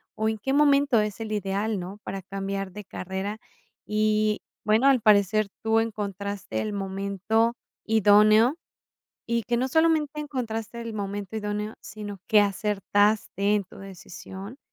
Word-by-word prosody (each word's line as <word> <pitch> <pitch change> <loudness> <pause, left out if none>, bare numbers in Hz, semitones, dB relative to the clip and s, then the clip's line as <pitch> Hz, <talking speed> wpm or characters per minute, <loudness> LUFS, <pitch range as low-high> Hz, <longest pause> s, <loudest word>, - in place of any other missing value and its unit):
o, 220 0 0
en 220 - -2
qué 270 +6 -1
momento 280 -4 +4
es 210 0 -3
el 220 -1 -5
ideal, 205 +1 -1
no, 185 +4 -7
para 195 - -5
cambiar 195 +1 -4
de 210 +2 -9
carrera?". 190 +4 -5 0.5
Y 215 0 +1 0.2
bueno, 220 +5 +3
al 265 -3 +5
parecer 210 0 +4
tú 225 0 +3
encontraste 200 - -4
el 210 - -3
momento 200 +4 0 0.3
idóneo, 215 - +5 0.7
y 235 -2 0
que 240 - 0
no 250 +2 +1
solamente 310 0 +2
encontraste 235 -6 -4
el 230 -1 -6
momento 200 0 -4
idóneo, 210 0 -3
sino 205 -1 -8
que 215 - +6
acertaste 205 0 +1
en 205 -1 0
tu - - -15
decisión, 195 +3 -10
210 Hz, 145 wpm, -26 LUFS, 200-225 Hz, 0.7 s, que